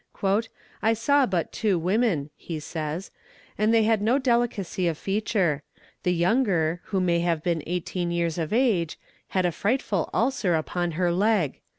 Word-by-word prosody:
"I 225 +1 +3
saw 270 +4 +3
but 180 -5 -1
two 205 -5 +1
women," 180 -4 +1
he 165 -3 -6
says, 155 +3 -5 0.4
"and 215 +2 +2
they 225 -1 +4
had 220 -1 +2
no 230 +5 +3
delicacy 235 -8 0
of 165 -3 -1
feature; 195 -7 0 0.4
the 180 - +1
younger, 175 -3 +1
who 195 - -1
may 175 -2 +2
have 170 -2 0
been 170 -2 0
eighteen 175 0 -2
years 170 -1 -1
of 160 -2 -2
age, 215 -9 +1 0.3
had 185 -1 0
a 175 - +2
frightful 205 -2 -1
ulcer 230 -8 +1
upon 170 +2 -2
her 175 +2 +1
leg. 190 -4 +1
180 Hz, 160 wpm, -25 LUFS, 170-220 Hz, 0.4 s, they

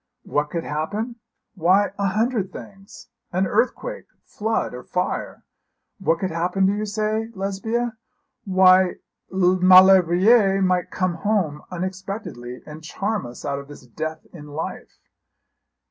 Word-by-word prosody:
'What 150 0 -1
could 165 +1 -3
happen? 210 +11 -3 0.4
Why 190 +3 +3
a 200 - +1
hundred 215 0 0
things 195 +4 -12 0.2
an 185 +2 +1
earthquake, 255 - -1 0.2
flood, 220 - -2
or 125 - -7
fire. 180 - -3 0.6
What 165 -4 +1
could 185 +1 -3
happen, 180 +4 0
do 195 - +3
you 210 +1 -3
say, 215 +1 -1
Lesbia? 220 +5 -2 0.5
Why 185 -2 +5 0.4
Maulevrier 185 +2 +6
might 180 -1 +1
come 185 -1 -1
home 165 -6 0
unexpectedly, 185 - -6
and 155 +1 -10
charm 200 - -3
us 120 - -10
out 140 -1 -2
of 140 - -10
this 145 -3 -13
death 155 +6 -6
in 150 -4 -10
life.' 150 +2 -6
185 Hz, 130 wpm, -23 LUFS, 165-205 Hz, 0.6 s, Maulevrier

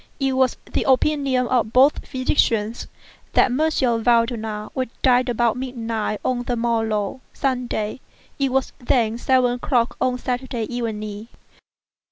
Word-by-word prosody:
It 270 -1 +1
was 260 -1 +2
the - - -2
opinion 270 -1 +2
of 235 -3 +1
both 270 +4 +4
physicians 235 -4 0 0.5
that - - +4
M. 260 -5 +1
Valdemar 225 -2 +1
would 255 -2 -2
die 255 -1 +5
about 240 -1 +1
midnight 230 -4 -3
on 250 -1 0
the 245 0 -2
morrow 225 -1 -1
(Sunday). 250 -4 -2 0.4
It 275 -2 +1
was 265 0 0
then 235 -2 +1
seven 255 -1 +3
o'clock 245 -1 0
on 250 -1 +1
Saturday 250 -1 -3
evening. 215 -2 -4
245 Hz, 130 wpm, -22 LUFS, 225-260 Hz, 0.5 s, die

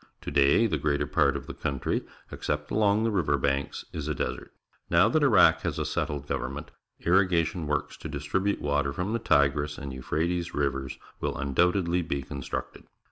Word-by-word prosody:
To - - -5
day 70 +10 +4
the 80 -9 0
greater 70 0 0
part - - +2
of - - -9
the - - -7
country, 70 -2 -2 0.3
except 75 0 -3
along 105 0 +3
the 115 - +1
river 75 -8 +1
banks, 70 +1 -1
is 75 -2 -4
a 75 - -1
desert. - - -4 0.4
Now 85 +5 +5
that 155 +6 +2
Iraq 95 - +5
has - - -2
a - - -1
settled 75 -2 -2
government, 70 +5 -4 0.3
irrigation 85 -3 +2
works 75 -1 -2
to - - -7
distribute 80 +8 -1
water 70 -1 0
from 95 +6 -2
the 115 - 0
Tigris 75 -4 +2
and 70 -1 -6
Euphrates 85 +7 -2
Rivers 70 -2 -1 0.2
will - - -2
undoubtedly 90 +5 +1
be 70 -5 -3
constructed. 70 -1 -6
75 Hz, 175 wpm, -27 LUFS, 70-90 Hz, 0.4 s, Now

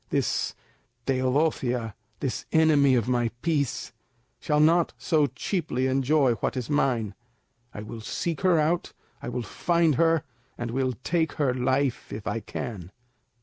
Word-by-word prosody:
This - - 0 0.5
Teodosia, 130 -3 0 0.3
this 130 -5 -3
enemy 150 -4 +5
of 120 -3 +1
my 120 -2 +1
peace, 150 -6 -1 0.5
shall 150 0 +1
not 165 +2 +4
so 155 -5 +2
cheaply 135 - -2
enjoy 135 0 +3
what - - -1
is 125 +2 -3
mine. 120 -8 +1 0.6
I 105 - -7
will 110 +1 -8
seek 165 +8 -3
her 185 -3 +4
out, 165 +3 0 0.3
I - - -5
will 125 0 -3
find 170 - +1
her, 165 -2 +3 0.3
and 120 -1 -4
will 130 +1 0
take 165 -2 0
her 140 -4 +1
life 130 +1 0
if 105 - -6
I 115 - -1
can." 105 -4 -6
135 Hz, 145 wpm, -26 LUFS, 120-155 Hz, 0.6 s, enemy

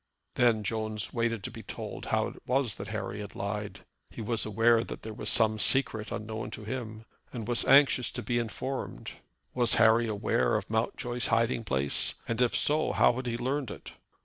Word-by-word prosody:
Then 115 -3 +3
Jones 110 0 -3
waited 115 -3 -1
to - - -5
be - - -9
told - - -7
how - - 0
it - - -14
was 125 -3 +1
that 100 - -6
Harry 105 -1 -4
had 105 - -9
lied. 105 +1 -5 0.2
He - - -12
was 115 0 -1
aware 115 +2 +3
that - - -8
there 110 - -6
was 105 0 -3
some 110 -1 +3
secret 110 -4 +1
unknown 110 0 -5
to 110 - -10
him, 110 -1 -6 0.3
and 115 -4 -6
was 120 -1 +2
anxious 135 -3 +5
to - - -4
be 120 -1 0
informed. 130 +3 -5 0.4
Was 120 -3 +4
Harry 115 +1 +5
aware 100 - +1
of - - -5
Mountjoy's 120 +2 -1
hiding 115 +1 +1
place, 70 -4 +2
and 115 +2 -1
if 125 - +2
so, 155 +2 +1
how - - +4
had 130 +1 -5
he 115 -1 -1
learned 130 +1 -2
it? - - -9
115 Hz, 190 wpm, -29 LUFS, 110-120 Hz, 0.4 s, anxious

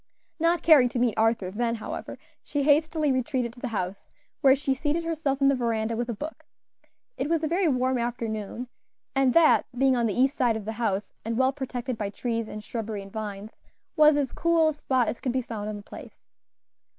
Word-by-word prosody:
Not 335 +1 +2
caring 285 -7 +6
to 245 - -4
meet 240 -2 +2
Arthur 220 -4 +1
then, 230 +3 -1
however, 220 - -6 0.2
she 290 -1 -2
hastily 305 +1 +3
retreated 255 -2 -1
to 245 - -15
the 255 - -3
house, 195 -4 -4 0.3
where 265 -1 +6
she 275 -1 0
seated 295 +5 -1
herself 300 -4 -2
in 275 - +5
the 275 - +5
veranda 230 -3 -1
with 240 +1 -3
a 235 - -2
book. 305 +9 -7 0.7
It - - -2
was 330 -1 +1
a - - +1
very 350 +3 +1
warm 255 -2 +1
afternoon, 235 0 -4 0.5
and 270 -2 +2
that, 335 -2 +5
being 265 0 +4
on 235 -1 +1
the 215 +3 -2
east 265 +2 +3
side 240 -5 +2
of 210 - -8
the 220 - -3
house 205 -3 -1
and 225 +1 -3
well 260 +1 +3
protected 255 -3 -4
by 205 -2 -2
trees, 230 +1 -3 0.2
shrubbery, 220 -3 -4
and 195 - -13
vines, 210 -1 -5 0.4
was 305 -2 +6
as 275 -3 -1
cool 335 -1 +3
a - - -2
spot 260 -5 0
as - - -3
could 250 - -2
be 260 -1 0
found 215 -2 -5
on 210 - -4
the 205 - -10
place. - - -12
250 Hz, 210 wpm, -26 LUFS, 225-285 Hz, 0.7 s, caring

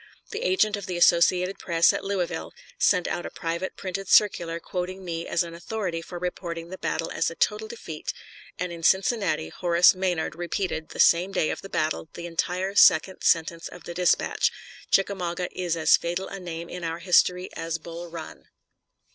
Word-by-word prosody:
The 435 +1 -4
agent 375 - +2
of 200 -2 -7
the 180 -2 -3
Associated 180 +2 +4
Press 170 -1 +3
at - - -3
Louisville 180 -4 -3 0.3
sent 180 -3 +3
out 175 - -2
a - - -5
private 170 +3 -4
printed 195 0 -5
circular 170 -5 +3
quoting 185 +2 -5
me 170 -1 -4
as 170 - +1
an 170 -1 -8
authority 175 -1 -4
for 175 - -8
reporting 170 -1 -5
the 190 - -8
battle 165 - -2
as - - 0
a 165 - -9
total 215 +4 0
defeat, 170 -9 -6 0.5
and 180 0 -3
in 170 -1 -8
Cincinnati 190 - +2
Horace 175 - +4
Maynard 185 -3 -1
repeated, 170 -2 -3
the - - -10
same 175 +3 +5
day 155 - +1
of - - -5
the 195 - -10
battle, 155 -1 -1
the 170 - -6
entire 180 +3 -2
second 190 -1 +5
sentence 165 0 +1
of 175 - -12
the 175 - -7
dispatch, 180 0 +2 0.4
"Chickamauga 180 -3 0
is 175 -2 -2
as 160 -1 +5
fatal 175 +3 -3
a 195 - -7
name 170 -2 -6
in 180 0 -7
our 165 0 -2
history 180 +1 +3
as 165 0 -3
Bull 170 +2 -8
Run." 165 -1 -9
175 Hz, 180 wpm, -26 LUFS, 170-190 Hz, 0.5 s, same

